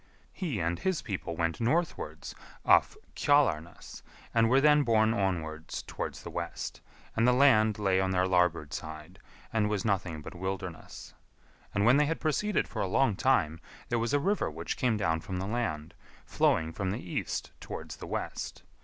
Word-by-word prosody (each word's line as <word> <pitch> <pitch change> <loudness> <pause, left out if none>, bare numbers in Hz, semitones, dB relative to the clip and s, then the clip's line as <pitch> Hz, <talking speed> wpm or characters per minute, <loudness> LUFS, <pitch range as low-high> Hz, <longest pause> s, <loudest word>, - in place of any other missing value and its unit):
He 155 - -3
and 85 +1 -1
his 190 -3 -1
people 90 -4 -4
went 85 +2 -1
northwards 160 +9 -1 0.3
off - - +4 0.2
Kjalarnes, 100 - +1 0.3
and 115 -1 +4
were 130 +2 +5
then 150 +1 +5
borne 110 -4 +3
onwards 85 -6 -2
towards - - -5
the - - -7
west, - - -5 0.3
and 115 +2 +3
the - - +6
land 110 -5 +5
lay 95 -3 +2
on 95 - 0
their 95 0 +2
larboard 90 -5 +1
side, 80 +4 -7 0.3
and 105 -2 +2
was 105 -1 -1
nothing 90 -7 -1
but - - -8
wilderness. 95 -2 -6 0.6
And 100 +1 +1
when 120 +4 +6
they 150 0 +3
had 165 - -1
proceeded 195 +7 0
for - - -4
a - - 0
long 120 +2 +2
time, 90 -11 +2 0.3
there 120 - +1
was 115 +2 -1
a 145 - +3
river 200 +7 +1
which 80 +2 -4
came 120 -4 +1
down 80 -6 +1
from 95 0 -5
the 95 - -2
land, 95 -9 -2 0.3
flowing 80 0 +1
from 95 +1 -2
the 105 +5 -2
east 90 - -4
towards - - -7
the - - -8
west. - - -4
100 Hz, 175 wpm, -30 LUFS, 85-125 Hz, 0.6 s, the